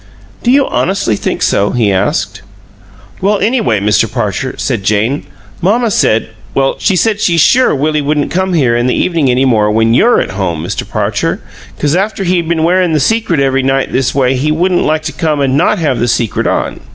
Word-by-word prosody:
"Do 240 - -1
you 275 +2 +4
honestly 190 - 0
think - - -3
so?" 100 - +1
he 115 -5 +1
asked. 95 - -1 0.8
"Well, 205 +2 +2
anyway, 200 - 0
Mr. 105 +2 +1
Parcher," 120 +2 -3
said 115 -7 -2
Jane, 110 +8 0 0.3
"mamma 220 +5 +1
said 115 - +1 0.3
well, 135 0 +1
she 195 - +1
said 210 +2 0
she's 170 -2 +2
sure 245 +8 +4
Willie 150 +2 0
wouldn't 145 0 -1
come 185 +1 -1
here 130 -8 +2
in 120 +1 0
the 125 - +1
evening 165 -7 0
any 125 +2 +2
more 110 -5 +2
when 110 +1 +2
YOU're 235 - +4
at - - -2
home, 85 -5 -3
Mr. - - -5
Parcher - - -2 0.4
'cause 145 +2 0
after 195 +1 -1
he'd 175 -2 0
been 165 -2 0
wearin' 180 0 +2
the 155 - +2
secret 200 - 0
every 135 -1 +1
night 135 +1 0
this 130 -1 -1
way 130 -2 +2
he 145 +4 0
wouldn't 175 +3 +1
like 155 0 0
to 155 - -4
come 155 -3 -1
and 135 -1 +1
not 160 - +2
have 145 -8 -1
the 120 - 0
secret 115 -2 -1
on. - - -2
145 Hz, 200 wpm, -12 LUFS, 120-180 Hz, 0.8 s, you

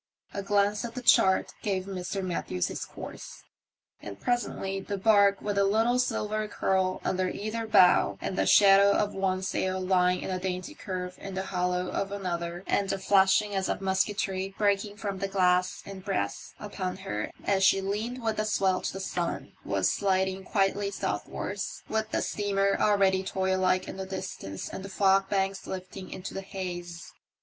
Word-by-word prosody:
A 200 - -3
glance 205 +1 +1
at 235 -1 -6
the 250 - -5
chart 190 -4 +4
gave 190 -3 -1
Mr. 190 0 -4
Matthews 130 - -2
his - - -4
course, - - -9 0.6
and 100 -1 -8
presently 195 -5 -1
the 200 +1 -4
barque, 200 -1 +4
with 205 -1 -1
a - - +5
little 225 +5 +2
silver 215 -3 -1
curl 190 -2 0
under 185 0 0
either 220 +3 -4
bow, 180 -4 +5
and - - -3
the - - +1
shadow 200 0 +7
of 205 0 0
one 190 -1 -1
sail 190 0 -1
lying 180 -1 +2
in - - -4
a 185 - -1
dainty 185 +9 -4
curve 180 -8 -5
in 195 -1 -7
the 190 - -2
hollow 180 -1 -1
of 195 0 -2
another, 175 -3 -3
and 200 -1 +1
a - - -1
flashing 195 +2 +3
as 190 -1 -1
of - - -1
musketry 190 0 -1
breaking 205 0 +1
from 200 -2 -4
the 195 - -1
glass 180 -2 +1
and 195 -1 -9
brass 100 - -3
upon 190 -3 -4
her 150 - -4 0.2
as 195 -1 +2
she 190 +1 +5
leaned 215 +6 -3
with 220 -1 0
the 215 - 0
swell 190 -3 +1
to - - -3
the 190 - -5
sun, 180 -2 -3
was - - +1
sliding 190 -1 0
quietly 200 +1 +1
southwards, 190 - -4
with 220 0 -1
the - - 0
steamer 200 -1 +1
already 195 -2 +3
toylike 190 -1 +1
in - - -7
the 190 0 -5
distance 185 - -6
and 190 - -7
the 195 - -7
fogbanks 195 0 +1
lifting 185 0 -7
into 185 - -7
the 195 - -4
haze. 175 -3 -6
195 Hz, 175 wpm, -28 LUFS, 185-200 Hz, 0.6 s, shadow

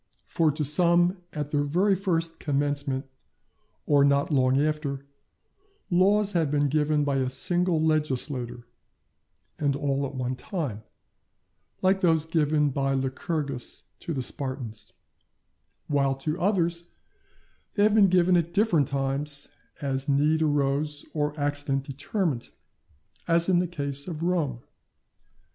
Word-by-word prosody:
For 160 -2 +1
to 150 +1 -2
some 175 +4 +3
at 150 -1 -5
their 145 - +1
very 180 +8 +2
first 165 -4 -1
commencement, 145 -1 -1 0.8
or 145 -1 +4
not 140 +2 +2
long 130 -1 +3
after, 145 -2 -1 0.9
laws 200 +3 +3
have 165 -4 +1
been 145 0 +1
given 150 0 +1
by 140 -1 0
a 130 -1 0
single 175 +5 +2
legislator, 140 -6 -1 0.9
and 145 -2 +1
all 140 -1 -1
at 135 - -10
one 130 0 -2
time; 140 - -4 1.0
like 190 +1 +3
those 160 -3 +3
given 150 -2 +1
by 135 0 0
Lycurgus 135 0 -3 0.2
to - - -6
the 135 -5 -2
Spartans; 130 -5 -6 0.9
while 140 -2 +1
to 155 +6 -4
others 170 -3 0 0.9
they 205 - +3
have 210 0 +4
been 210 -2 +6
given 180 0 +4
at 170 +1 0
different 190 - +3
times, 140 +1 -1 0.3
as 135 0 -1
need 150 +3 +2
rose 145 0 0
or 150 0 -2
accident 145 -1 -1
determined; 140 - -3 0.8
as 170 0 +3
in 180 -2 +3
the 180 - 0
case 140 -4 -2
of 165 -2 -5
Rome. 160 -9 -1
150 Hz, 130 wpm, -26 LUFS, 140-170 Hz, 1.0 s, been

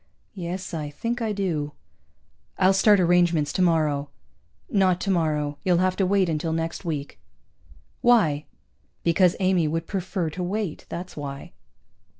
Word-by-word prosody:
"Yes, 185 -1 -5
I 150 -3 -3
think 235 +11 -3
I 220 -2 0
do." 165 -8 -2 0.8
"I'll 190 0 +4
start 205 +1 +5
arrangements 175 -4 +3
tomorrow." 155 -5 +1 0.6
"Not 190 -7 +2
tomorrow. 155 -7 0
You'll 180 -2 +3
have 185 +1 +2
to 190 - +2
wait 195 -1 +3
until 160 0 -1
next 165 +3 -3
week." 150 -5 -4 0.8
"Why?" 165 -12 +3 0.6
"Because 170 +1 +3
Amy 185 -4 +2
would 165 +2 -2
prefer 185 -3 -3
to 180 - -6
wait, 190 -1 -3
that's 180 +2 -6
why." 140 -2 -7
175 Hz, 135 wpm, -25 LUFS, 155-190 Hz, 0.8 s, start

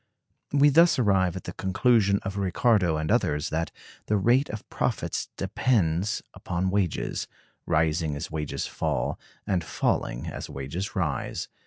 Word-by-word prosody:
We 145 +1 +5
thus 165 +4 +5
arrive 95 -7 +2
at 95 - -6
the 90 - -6
conclusion 100 +2 +3
of 100 - -4
Ricardo 95 -3 +2
and 80 0 -1
others, 75 0 +1
that 80 +1 -1 0.4
the 105 - +2
rate 120 +8 +3
of 110 -1 -7
profits - - -2
depends 100 -4 +1
upon 90 +1 -2
wages; 95 -4 -1 0.4
rising 80 -1 +1
as 75 +3 -5
wages 75 -2 -3
fall, - - -2 0.3
and 90 -4 0
falling - - -1
as - - -6
wages 70 +11 -5
rise. 85 -8 -2
95 Hz, 140 wpm, -27 LUFS, 80-105 Hz, 0.4 s, We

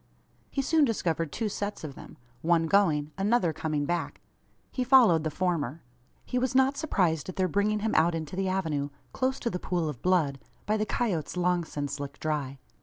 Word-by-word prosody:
He 275 - -1
soon 315 +2 +3
discovered 165 - 0
two 225 - -2
sets 205 -1 -4
of 150 -3 -5
them - - -12 0.2
one 165 0 +3
going 160 -6 +2
another 195 -4 +2
coming 150 -2 -1
back. 175 +1 -2 0.5
He 255 - -1
followed 240 - +6
the 155 - 0
former. 165 -3 -2 0.4
He 250 - -1
was 260 0 -1
not 265 +1 +4
surprised 180 - 0
at 185 - -6
their 185 -1 +1
bringing 205 +4 +1
him 220 +1 0
out 165 +1 +3
into 160 +1 -5
the 190 0 0
avenue 160 -7 -1 0.2
close 260 0 0
to 235 - -1
the 180 - -3
pool 175 -3 -1
of 145 -6 -5
blood 160 -7 +2 0.3
by 210 - +1
the 215 0 -1
coyotes 180 -9 -1
long 180 -1 +2
since 145 -2 -4
licked 145 0 -6
dry. 145 -3 -2
180 Hz, 190 wpm, -28 LUFS, 155-210 Hz, 0.5 s, followed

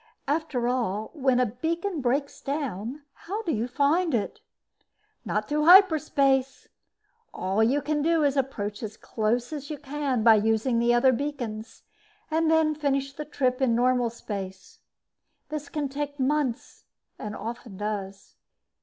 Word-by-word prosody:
After 285 -5 -1
all, 220 -4 -1
when 265 -5 +2
a 250 - +4
beacon 325 - -2
breaks 275 +3 -1
down, 275 -2 -4
how 415 +5 -5
do 335 - -1
you 230 -3 -1
find 290 +5 +2
it? 210 - -2 0.9
Not - - -1
through 300 0 0
hyperspace. 300 -7 +5 0.7
All 190 +4 0
you 265 +6 +2
can 300 -1 0
do 325 +1 +2
is 285 -1 +2
approach 210 -7 -2
as 215 -1 -6
close 235 +5 -1
as 290 -1 -6
you 305 - -4
can 275 -4 -2
by 225 -1 +8
using 225 +3 +1
other 240 +2 +5
beacons, 240 -5 -4 0.5
then 320 -1 +3
finish 275 -2 -1
the 300 +2 -6
trip 260 -3 -1
in 245 -3 +3
normal 245 0 +2
space. 195 -4 -7 0.7
This 300 -2 -5
can 295 -2 -2
take 285 +1 -5
months, 270 -2 -1 0.3
and 210 0 -5
often 230 -3 -7
does. 200 -2 -5
265 Hz, 140 wpm, -26 LUFS, 230-295 Hz, 0.9 s, by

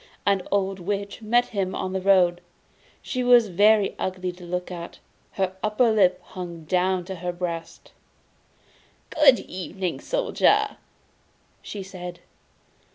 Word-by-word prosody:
An 200 -1 +3
old 195 -1 0
Witch 200 +3 -4
met 240 +3 +2
him 195 -4 -2
on 185 0 -3
the 190 - -1
road. 180 -2 +4 0.6
She 255 -1 -2
was 245 -3 +6
very 205 +2 +4
ugly 185 -1 -2
to 180 0 -14
look 180 +1 -4
at: 170 -1 -7 0.4
her 190 -1 -1
under 215 +2 +2
lip 185 -4 +3
hung 170 -3 -8
down 180 +2 0
to 190 0 -6
her 175 +1 -3
breast. 170 -2 -6 1.2
'Good 280 -5 +5
evening, 185 0 -5
Soldier!' - - +1 0.8
she 200 -2 -7
said. 180 -2 -8
190 Hz, 130 wpm, -24 LUFS, 180-205 Hz, 1.2 s, was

